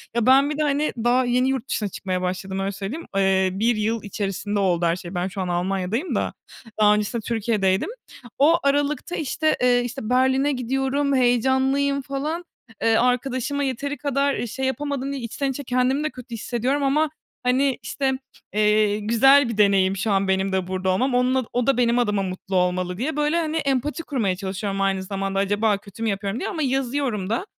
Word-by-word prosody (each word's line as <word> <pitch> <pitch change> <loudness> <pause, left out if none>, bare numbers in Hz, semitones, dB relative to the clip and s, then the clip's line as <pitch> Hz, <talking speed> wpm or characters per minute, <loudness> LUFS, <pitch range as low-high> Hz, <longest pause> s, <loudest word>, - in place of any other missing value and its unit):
Ya, 235 -2 +1
ben 270 +3 +5
bir 300 - -3
de, - - 0
hani, 295 +1 0
daha 245 +3 +2
yeni 250 +1 +2
yurt 265 -1 -2
dışına 210 -2 -1
çıkmaya 185 -1 -3
başladım 190 +1 -3
öyle 195 +1 -1
söyleyeyim. 205 - -6
Eee, 190 -1 +3
1 225 +5 +1
yıl 220 +1 -1
içerisinde 205 0 -3
oldu 175 -3 +1
her 170 +1 +2
şey. 180 +1 -8
Ben 175 +1 -1
şu 190 +1 -5
an 185 - -2
Almanya'dayım 190 - -1
da - - -1 0.5
daha 210 0 +6
öncesinde 210 +2 -2
Türkiye'deydim. 210 - 0 0.5
O 325 +5 +5
aralıkta, 285 +4 0
işte, 310 +1 0
eee, 245 -1 +4
işte, 245 -2 -5
Berlin'e 260 +3 +3
gidiyorum, 270 +3 0
heyecanlıyım 265 +3 +2
falan. 290 +6 -3 0.4
Eee, 225 0 +4
arkadaşıma 255 +3 0
yeteri 280 +2 -2
kadar, 280 -1 0
eee, 240 - -3
şey 265 +4 -3
yapamadım 275 +1 -2
diye 275 -2 -4
içten 270 +4 -2
içe 285 +2 -6
kendimi 255 +3 +1
de 310 - 0
kötü 250 -3 -11
hissediyorum 250 +5 -1
ama, 300 +3 +2 0.3
hani, 260 +2 +2
işte, 270 -1 -1 0.4
eee, 210 0 +3
güzel 235 +5 +5
bir 220 - -4
deneyim 195 -2 +3
şu 205 +2 -1
an 195 0 +2
benim 190 0 +1
de 190 -1 -1
burada 185 0 -2
olmam. 245 +8 +1
Onun 255 0 +2
o 245 -1 0
da 275 - +3
benim 240 0 +3
adıma 210 -4 +1
mutlu 185 +1 -5
olmalı 180 0 0
diye, 275 +6 -2
böyle, 300 +3 +1
hani, 320 -1 -1
empati 290 +2 -1
kurmaya 225 - -1
çalışıyorum 195 +1 -3
aynı 195 -1 +1
zamanda 195 0 -2
acaba 205 +1 +1
kötü 200 +2 -10
mü 225 - +1
yapıyorum 200 +3 -2
diye - - -3
ama 325 -5 -3
yazıyorum 260 -6 -1
da. 290 - -1
240 Hz, 190 wpm, -23 LUFS, 195-275 Hz, 0.5 s, daha